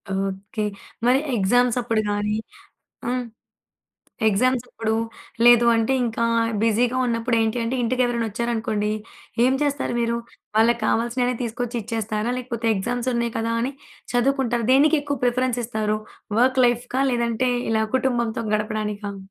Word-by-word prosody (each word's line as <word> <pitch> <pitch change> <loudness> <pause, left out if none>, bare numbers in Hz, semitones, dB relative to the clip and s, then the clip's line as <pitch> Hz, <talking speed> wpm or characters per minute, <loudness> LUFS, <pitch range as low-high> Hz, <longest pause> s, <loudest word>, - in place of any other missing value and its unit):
Okay. 195 +2 -3 0.4
మరి 250 +2 +5 0.2
exams 245 +5 +3
అప్పుడు 225 -2 0
గానీ, 205 +1 0 0.7
హ్మ్. 250 0 -1 1.0
ఎగ్జామ్స్ 245 +4 +2
అప్పుడు. 220 0 -2 0.5
లేదు 240 0 +7
అంటే 225 +3 +2
ఇంకా 230 0 -1 0.4
బిజీగా 235 +3 +2
ఉన్నప్పుడేంటంటే 230 0 0
ఇంటికి 255 +2 +1
ఎవరైనా 235 -2 -1
వచ్చారు 235 +3 -2
అనుకోండి, 215 -2 -1 0.5
ఏం 260 - +3
చేస్తారు 285 -3 0
మీరు? 235 0 0 0.4
వాళ్ళకి 235 +2 +4
కావాల్సినవి 245 +2 +1
తీసుకొచ్చి 240 +1 -3
ఇచ్చేస్తారా? 220 0 -2
లేకపోతే, 240 -2 -4
ఎగ్జామ్స్ 245 +6 -1
ఉన్నాయి 235 -1 -1
కదా! 230 0 -1
అని 265 +4 -2 0.4
చదువుకుంటారా? 245 -2 +1
దేనికి 300 +4 +5
ఎక్కువ 285 -1 -3
ప్రిఫరెన్స్ 245 0 +1
ఇస్తారు. 215 -2 -1 0.4
వర్క్ 260 +1 +3
లైఫ్‌కా? 245 +2 -1
లేదంటే 235 +1 0 0.2
ఇలా 220 0 +2
కుటుంబంతో 240 -3 0
గడపడానికా? 210 -1 -2
235 Hz, 125 wpm, -23 LUFS, 220-245 Hz, 1.0 s, లేదు